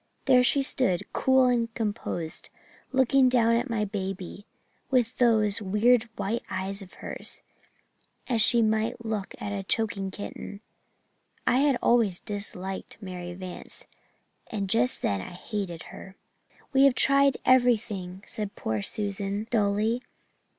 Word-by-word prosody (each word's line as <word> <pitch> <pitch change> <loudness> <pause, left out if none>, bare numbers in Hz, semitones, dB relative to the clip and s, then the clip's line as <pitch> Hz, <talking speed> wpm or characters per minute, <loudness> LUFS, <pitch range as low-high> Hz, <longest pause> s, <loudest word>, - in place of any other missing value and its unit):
There 255 -2 +6
she 275 +2 +3
stood, 200 -9 +1
cool 260 -1 +4
and 235 -2 +1
composed, 205 -7 -2 0.4
looking 265 0 +4
down 230 -2 +4
at 240 +3 -1
my 220 -2 0
baby, 195 0 -5 0.4
with 250 -2 +1
those, 220 -3 +3
weird 220 +4 +3
white 225 +5 -2
eyes 195 +2 -3
of 190 - -12
hers, - - -6 0.9
as 235 -4 +2
she 235 +1 +5
might 220 +1 0
look 215 -3 -3
at 205 - -5
a 200 - -2
choking 195 -1 -1
kitten. 205 +1 -8 0.8
I 245 - +3
had 280 -1 +3
always 220 -7 +3
disliked 195 -2 -5
Mary 180 -3 -7
Vance 185 -1 -9 0.6
and 200 -3 -3
just 245 +3 +2
then 100 -1 0
I 95 - -8
hated 180 -3 -5
her. 190 0 -11 0.6
"'We 270 +1 +6
have 275 -3 +5
tried 275 0 +4
everything,' 215 -7 +2
said 210 -2 -4
poor 110 -2 -2
Susan 200 - -2
dully. 215 +2 +1
215 Hz, 135 wpm, -27 LUFS, 195-245 Hz, 0.9 s, There